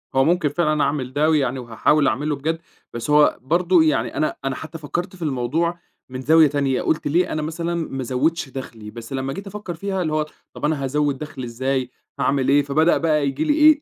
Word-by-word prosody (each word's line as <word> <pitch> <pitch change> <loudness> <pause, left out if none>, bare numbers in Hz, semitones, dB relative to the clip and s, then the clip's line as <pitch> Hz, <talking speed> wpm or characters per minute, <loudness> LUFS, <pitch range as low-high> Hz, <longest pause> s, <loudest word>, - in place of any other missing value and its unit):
هو 135 - +5
ممكن 165 -1 +2
فعلًا 155 -1 +1
أعمل 130 -3 -1
ده 150 +3 +2
ويعني 135 -4 +1
هاحاول 125 +5 +2
أعملُه 145 +6 0
بجد 160 +4 -2 0.3
بس 120 +5 -5
هو 150 0 +5
برضه 170 +4 +3
يعني 120 -7 0
أنا 155 - 0
أنا 135 -1 -1
حتى 160 +1 -8
فكَّرت 175 +5 -4
في 180 - -17
الموضوع 160 +5 -1 0.3
من 130 0 -6
زاوية 160 +3 +6
تانية، 140 -2 0
قلت 155 - 0
ليه 170 +5 +1
أنا 155 - -1
مثلًا 165 +2 -3
ما 155 -5 -3
ازوِّدش 135 +4 0
دخلي 115 -5 -8
بس 115 +3 -9
لمَّا 135 0 -2
جيت 195 +1 -7
أفكَّر 205 -3 -6
فيها، 190 +2 -3
اللي 155 -3 -1
هو 155 0 +1 0.3
طب - - -4
أنا 150 -2 0
هازوِّد 145 0 0
دخلي 150 -3 -7
إزاي، 130 +2 -2 0.3
هاعمل 135 0 +1
إيه 145 +1 +5
فبدأ 155 +4 +3
بقى 155 -3 +1
ييجي 135 - -1
لي 300 -2 +2
إيه، 305 0 +6
150 Hz, 210 wpm, -22 LUFS, 135-165 Hz, 0.3 s, زاوية